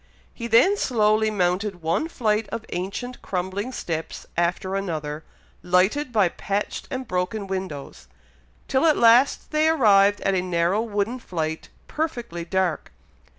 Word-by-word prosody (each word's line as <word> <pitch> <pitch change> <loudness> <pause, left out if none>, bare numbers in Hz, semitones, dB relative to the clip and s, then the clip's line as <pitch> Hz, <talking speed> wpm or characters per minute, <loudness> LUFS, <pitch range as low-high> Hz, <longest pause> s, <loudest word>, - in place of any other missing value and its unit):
He 235 - -5
then 365 - +5
slowly 220 - +2
mounted 185 -1 -1
one 165 - 0
flight 215 -8 0
of 230 -1 -5
ancient 200 +8 -5
crumbling 190 +5 -3
steps 165 -9 -5
after 180 +3 0
another, 155 -5 -3 0.4
lighted 190 +11 +2
by 210 -5 +4
patched 200 +4 -3
and 260 -2 -4
broken 180 +3 -2
windows, 185 - -6 0.6
till 265 +5 +2
at 310 - +4
last 235 +4 +4
they 310 +1 +3
arrived 205 -9 +4
at 195 - +1
a 185 - +1
narrow 180 +3 +1
wooden 225 +2 -2
flight, 160 -7 -4 0.2
perfectly 240 - -3
dark. 185 -1 -1
200 Hz, 135 wpm, -24 LUFS, 180-235 Hz, 0.6 s, then